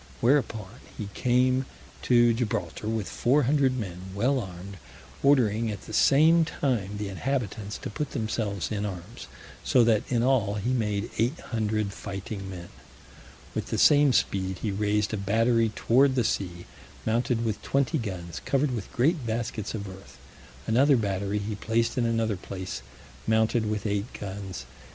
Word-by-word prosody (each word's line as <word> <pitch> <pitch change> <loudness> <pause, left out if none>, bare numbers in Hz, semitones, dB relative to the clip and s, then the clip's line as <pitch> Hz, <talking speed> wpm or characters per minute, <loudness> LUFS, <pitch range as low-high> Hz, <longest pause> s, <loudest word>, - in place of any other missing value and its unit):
Whereupon 115 -5 +1 0.2
he 105 -2 -5
came 130 +1 +2 0.3
to 120 -1 +4
Gibraltar 115 -2 -2
with 110 -3 -1
four 140 +5 +2
hundred 135 -1 +2
men 90 -7 -5 0.2
well 130 +6 +2
armed, 95 -1 -8 0.4
ordering 115 -5 +3
at 100 -2 -5
the - - -10
same 160 +8 +5
time 120 -10 -1
the 105 0 -3
inhabitants 105 0 -3
to - - -4
put 150 +7 -3
themselves 110 -3 -2
in 105 -1 -1
arms, 95 +2 -6 0.4
so 125 - +4
that 115 -2 +4
in 120 -2 +2
all 120 -6 +2
he 105 +5 -1
made 105 -3 -1
eight 120 +7 +1
hundred 110 -3 -1
fighting 100 0 -6
men. 90 -2 -8 0.8
With - - -3
the - - -2
same 145 -2 +6
speed 95 -5 0
he 105 - 0
raised 105 +1 0
a - - 0
battery 115 +3 +2
toward 130 +3 +3
the 125 - +2
sea, 90 -5 -2 0.4
mounted 115 +1 +1
with 110 -2 -2
twenty 140 +3 +1
guns, 90 -7 -5
covered 140 0 +1
with 115 -6 -5
great 145 +4 +2
baskets 110 -1 -3
of 100 -2 -5
earth: 95 +1 -12 0.5
another 135 +5 +4
battery 100 -1 -1
he 105 +1 -3
placed 115 +3 0
in 120 -3 +1
another 115 -3 0
place, 95 0 -6 0.5
mounted 110 0 +2
with 105 0 -2
eight 105 +2 -1
guns. 95 -8 -6
110 Hz, 155 wpm, -27 LUFS, 100-125 Hz, 0.8 s, same